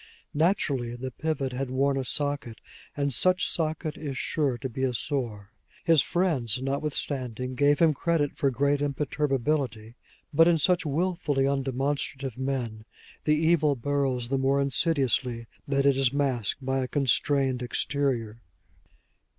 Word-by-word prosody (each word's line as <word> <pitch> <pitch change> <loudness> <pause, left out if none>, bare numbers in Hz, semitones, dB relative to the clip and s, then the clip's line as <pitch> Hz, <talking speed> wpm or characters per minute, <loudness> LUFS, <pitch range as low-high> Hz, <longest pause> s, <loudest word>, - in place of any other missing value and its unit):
Naturally 145 -7 +1
the 130 +1 -5
pivot 135 -2 -2
had 130 +1 -3
worn 135 +2 +1
a 135 - -1
socket, 145 -3 -2 0.4
and 140 -1 0
such 185 - +2
socket 155 -1 -2
is 140 -4 -5
sure 140 -6 0
to 130 - -4
be 130 +1 -6
a 130 -2 0
sore. 115 -6 -3 0.3
His 165 -4 +5
friends 140 - 0
notwithstanding 130 -3 -2
gave 145 +2 +3
him 160 -1 +4
credit 155 -2 0
for 140 - +1
great 140 +3 +1
imperturbability; 135 -5 -1 0.4
but 165 +3 +6
in 170 -1 +4
such 175 +2 +2
willfully 155 -2 0
undemonstrative 135 -1 -2
men 125 -5 -3 0.4
the 150 - +4
evil 155 -2 +3
burrows 130 -2 -1
the 135 0 +1
more 135 +1 +2
insidiously 135 -4 +1 0.2
that 140 0 +1
it 140 -1 +5
is 135 -2 +3
masked 135 -3 -1
by 135 0 0
a 130 - -1
constrained 135 -1 +1
exterior. 120 -3 -1
140 Hz, 140 wpm, -27 LUFS, 130-145 Hz, 0.4 s, but